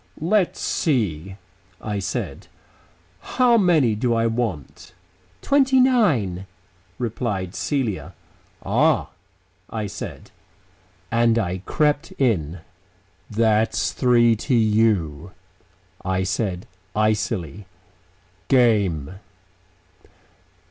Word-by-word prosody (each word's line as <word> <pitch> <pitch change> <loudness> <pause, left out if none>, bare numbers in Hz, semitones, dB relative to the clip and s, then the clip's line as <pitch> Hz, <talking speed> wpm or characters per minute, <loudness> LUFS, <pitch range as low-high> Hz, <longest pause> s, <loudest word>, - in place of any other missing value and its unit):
"Let's 185 +3 +1
see," 95 - -1 0.4
I 105 -2 -3
said, 95 - -4 0.7
"how 245 - +2
many 170 - +3
do 120 +2 0
I 115 0 +1
want?" 110 - -4 0.5
"Twenty 270 -2 +3
nine," 145 - +2 0.5
replied 105 -6 -3
Celia. 100 - -3 0.5
"Ah," - - +2 0.6
I 110 -2 -3
said... 100 - -8 0.8
and 115 0 +3
I 95 -4 -1
crept 150 +1 0
in. 90 - -1 0.7
"That's 110 0 +1
three 120 -2 +3
to 125 +4 -1
you," 105 -8 +1 0.7
I 95 0 -1
said 95 -1 -2 0.3
icily. 105 - -1 0.8
"Game." 100 - +2
110 Hz, 80 wpm, -22 LUFS, 95-125 Hz, 0.8 s, many